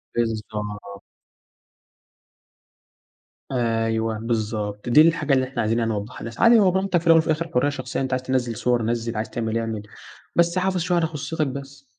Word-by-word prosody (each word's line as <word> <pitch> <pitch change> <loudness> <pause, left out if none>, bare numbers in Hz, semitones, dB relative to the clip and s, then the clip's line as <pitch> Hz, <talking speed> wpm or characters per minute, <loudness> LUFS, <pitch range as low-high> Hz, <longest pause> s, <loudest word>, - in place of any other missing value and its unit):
بالضبط. 105 -3 -3 2.5
أيوه، 115 -2 0
بالضبط، 110 -2 -3
دي 135 +6 +7
الحاجة 155 -3 +3
اللي 130 -1 +2
إحنا 130 - -3
عايزين 115 +2 +1
يعنى 115 -1 0
نوضحها 105 +2 -5
للناس. 115 0 -8
عادي 230 0 +7
هو 190 -3 +4
براحتك 190 -1 +1
في 170 - -7
الأول 165 0 +7
وفي 160 - -1
الآخر 165 +2 0
حرية 125 +4 +2
شخصية 135 -2 -4
أنت 130 -1 -2
عايز 130 0 -1
تنزِّل 125 -3 -1
صور 120 -1 +1
نزِّل، 115 0 -2
عايز 110 - -3
تعمل 115 -1 -2
اعمل، 115 -2 -3 0.5
بس 170 +1 +3
حافظ 185 0 +1
شوية 175 +1 +1
على 165 -1 +2
خصوصيتك 155 0 -3
بس. 140 +1 -8
125 Hz, 170 wpm, -23 LUFS, 115-155 Hz, 2.5 s, دي